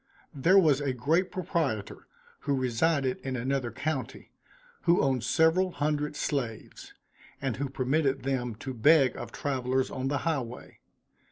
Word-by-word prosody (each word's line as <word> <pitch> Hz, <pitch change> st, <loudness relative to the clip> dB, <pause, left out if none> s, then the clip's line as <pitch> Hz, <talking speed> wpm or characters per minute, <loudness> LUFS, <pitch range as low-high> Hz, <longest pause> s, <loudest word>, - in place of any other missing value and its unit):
There 170 Hz, +8 st, +4 dB
was 150 Hz, -7 st, +4 dB
a 140 Hz, -2 st, -1 dB
great 160 Hz, +9 st, +1 dB
proprietor, 165 Hz, -, -2 dB, 0.3 s
who 140 Hz, -, -1 dB
resided 130 Hz, +2 st, +1 dB
in 130 Hz, -1 st, -4 dB
another 130 Hz, 0 st, -1 dB
county, 135 Hz, +3 st, -4 dB, 0.5 s
who 170 Hz, 0 st, +4 dB
owned 130 Hz, -4 st, +1 dB
several 160 Hz, +8 st, +3 dB
hundred 150 Hz, 0 st, -1 dB
slaves; 125 Hz, -7 st, -4 dB, 0.4 s
and 135 Hz, -5 st, -2 dB
who 140 Hz, 0 st, -2 dB
permitted 135 Hz, +1 st, 0 dB
them 125 Hz, -4 st, -2 dB
to 130 Hz, +4 st, -6 dB
beg 135 Hz, +2 st, +4 dB
of -, -, -7 dB
travelers 130 Hz, -1 st, -1 dB
on 130 Hz, 0 st, -3 dB
the 145 Hz, +1 st, 0 dB
high 160 Hz, -4 st, +1 dB
way. 120 Hz, 0 st, -10 dB
135 Hz, 145 wpm, -28 LUFS, 130-155 Hz, 0.5 s, There